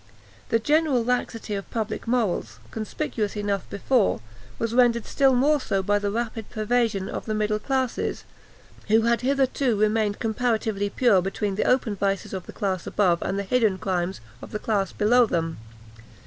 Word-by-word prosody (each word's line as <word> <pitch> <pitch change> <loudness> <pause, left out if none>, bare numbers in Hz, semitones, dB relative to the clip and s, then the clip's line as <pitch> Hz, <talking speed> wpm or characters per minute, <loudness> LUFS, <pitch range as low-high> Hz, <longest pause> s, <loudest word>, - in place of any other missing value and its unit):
The 230 - +4
general 295 0 +2
laxity 240 -3 -2
of 195 -1 -4
public 220 0 -3
morals, 230 -6 0
conspicuous 220 -1 -3
enough 205 -1 -2
before, 225 +2 +1 0.4
was 230 0 -2
rendered 240 -2 +3
still 270 -2 +3
more 290 +4 +3
so 195 -5 -1
by 205 +2 +2
its 205 - -3
rapid 225 +1 -3
pervasion 215 -3 0
of - - -6
the 215 - -1
middle 215 0 0
classes, 260 +1 -1 0.6
who 220 +1 +4
had 235 +1 +2
hitherto 265 -2 +1
remained 215 0 +1
comparatively 220 -3 -1
pure 215 -5 +3
between 195 +2 -2
the 195 - -1
open 245 -5 +2
vices 195 0 -1
of 185 -2 -5
the - - -7
class 190 -3 -2
above 180 -4 +2
and 195 - -2
the 200 - -1
hidden 215 -2 +2
crimes 185 - -2 0.2
of - - -9
the - - -3
class 205 -3 -1
below 235 +3 +4
them. 165 - -2
215 Hz, 165 wpm, -25 LUFS, 200-245 Hz, 0.6 s, The